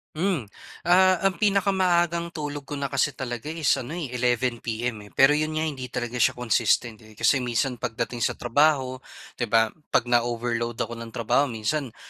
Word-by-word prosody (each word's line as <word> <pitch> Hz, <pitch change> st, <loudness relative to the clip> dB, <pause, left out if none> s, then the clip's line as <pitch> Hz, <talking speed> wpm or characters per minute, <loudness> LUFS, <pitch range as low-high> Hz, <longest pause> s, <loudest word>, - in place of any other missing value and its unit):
Hmm. 175 Hz, -, 0 dB, 0.4 s
Ah, 185 Hz, +1 st, +4 dB
ang 190 Hz, -3 st, +1 dB
pinakamaagang 180 Hz, -4 st, +1 dB
tulog 145 Hz, -2 st, -5 dB
ko 145 Hz, -, -5 dB
na 140 Hz, -1 st, -3 dB
kasi 135 Hz, 0 st, +1 dB
talaga 120 Hz, 0 st, -5 dB
is 160 Hz, -2 st, 0 dB
ano, 130 Hz, +7 st, -6 dB
eh, 155 Hz, -8 st, -5 dB
11 125 Hz, -1 st, 0 dB
PM, 110 Hz, -2 st, -4 dB
eh. -, -, -19 dB
Pero 135 Hz, +2 st, +6 dB
'yon 155 Hz, +1 st, 0 dB
nga, 155 Hz, -, 0 dB
hindi 135 Hz, -5 st, -4 dB
talaga 120 Hz, 0 st, -4 dB
siya -, -, +3 dB
consistent, 115 Hz, -1 st, +1 dB
eh. 110 Hz, -1 st, -17 dB
Kasi 135 Hz, -, +3 dB
minsan, 125 Hz, +1 st, -1 dB
pagdating 120 Hz, 0 st, -3 dB
sa -, -, 0 dB
trabaho, 130 Hz, 0 st, +2 dB, 0.4 s
'di 120 Hz, -, 0 dB
ba, 110 Hz, 0 st, +3 dB, 0.2 s
'pag 120 Hz, -, +2 dB
na-overload 120 Hz, 0 st, 0 dB
ako 115 Hz, 0 st, -4 dB
ng 115 Hz, -1 st, -9 dB
trabaho, 120 Hz, +5 st, +2 dB
minsan 120 Hz, +2 st, -3 dB
125 Hz, 180 wpm, -25 LUFS, 120-155 Hz, 0.4 s, Pero